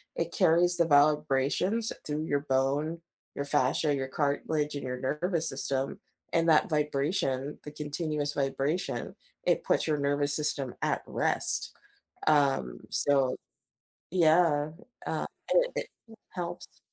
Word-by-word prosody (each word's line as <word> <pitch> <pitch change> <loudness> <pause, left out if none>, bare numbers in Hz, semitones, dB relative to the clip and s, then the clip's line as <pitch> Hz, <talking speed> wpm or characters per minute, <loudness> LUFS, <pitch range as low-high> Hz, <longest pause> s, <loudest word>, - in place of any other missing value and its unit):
it - - -2
carries 175 +2 +3
the 170 - +4
vibrations 150 +8 +2
through 150 +1 -2
your 145 -2 0
bone, 145 +4 0 0.3
your 140 - -2
fascia, 140 +2 +2
your 135 -1 -2
cartilage 145 +2 -1
and 145 - -4
your 125 0 -3
nervous 165 +5 -1
system, 135 0 -2 0.3
and 165 0 +2
that 155 +2 +4
vibration, 145 -2 0
the 150 - -8
continuous 150 0 -3
vibration, 140 +4 -2 0.3
it - - +2
puts - - +2
your 155 -1 +1
nervous 145 0 +1
system 145 -4 -1
at - - 0
rest. - - 0 0.5
Um, 135 - +2
so, 135 -2 +2 0.7
yeah, 160 -3 +3 0.3
uh, - - -1 0.3
it - - +3
it - - -2 0.4
helps. 175 -1 -6
150 Hz, 125 wpm, -29 LUFS, 140-160 Hz, 0.7 s, the